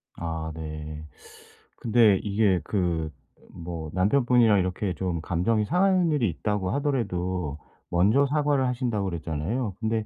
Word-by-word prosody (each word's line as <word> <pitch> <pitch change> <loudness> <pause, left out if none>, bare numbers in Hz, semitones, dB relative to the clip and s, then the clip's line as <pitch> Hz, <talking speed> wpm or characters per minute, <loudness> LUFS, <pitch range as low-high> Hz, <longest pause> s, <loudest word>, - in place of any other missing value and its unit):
아 80 -1 -4
네. 75 -1 -7 0.7
근데 110 -3 +4
이게 100 -2 +2
그 85 -5 -1 0.4
뭐 85 -2 -6
남편분이랑 115 +2 +4
이렇게 95 +1 -1
좀 85 -1 -2
감정이 95 +7 0
상하는 180 - +2
일이 130 -9 +1
있다고 95 +3 -2
하더라도 95 - -1 0.3
먼저 105 +11 +3
사과를 145 -2 +1
하신다 120 -4 -1
그랬잖아요. 90 - -3
근데 110 -1 -1
100 Hz, 280 characters per minute, -26 LUFS, 85-120 Hz, 0.7 s, 근데